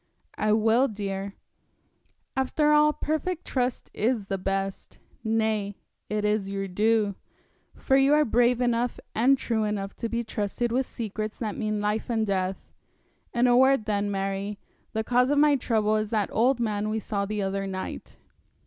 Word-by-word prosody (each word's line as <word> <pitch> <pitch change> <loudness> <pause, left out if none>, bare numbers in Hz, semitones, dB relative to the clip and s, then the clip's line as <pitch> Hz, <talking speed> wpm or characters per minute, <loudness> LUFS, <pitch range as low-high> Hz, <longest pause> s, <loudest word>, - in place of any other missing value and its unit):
'I 215 0 +1
will, 225 +4 +4
dear. 200 -2 -4 1.0
After 280 +3 +2
all 300 0 +5
perfect 315 +4 -2
trust 250 -2 -2
is 225 -1 0
the 195 0 -3
best; 195 +1 -3 0.3
nay, 220 -3 0 0.3
it 210 0 -1
is 210 -2 0
your 195 0 -3
due, 210 +2 +2 0.6
for 265 - +1
you 275 +2 +5
are 300 0 +4
brave 245 +1 +3
enough 240 0 0
and 260 +5 +4
true 230 -4 -1
enough 205 -2 -3
to 230 - -3
be 235 +1 -1
trusted 225 +2 -2
with 255 +2 0
secrets 215 -1 -5
that 215 -3 -3
mean 215 -1 -2
life 210 +3 -1
and 225 -2 +1
death. 190 -1 -2 0.6
In 240 +1 +2
a 245 -1 +5
word, 265 -2 +4
then, 205 -1 0
Mary, 195 +1 -2 0.3
the 220 - -1
cause 250 +3 +2
of 290 - +2
my 295 0 +5
trouble 220 -4 +1
is 215 -1 -2
that 210 -3 0
old 245 +3 +3
man 215 -2 -1
we 220 - -1
saw 200 -2 -2
the 210 -1 -2
other 195 0 -2
night.' 190 -1 -6
220 Hz, 165 wpm, -26 LUFS, 205-245 Hz, 1.0 s, all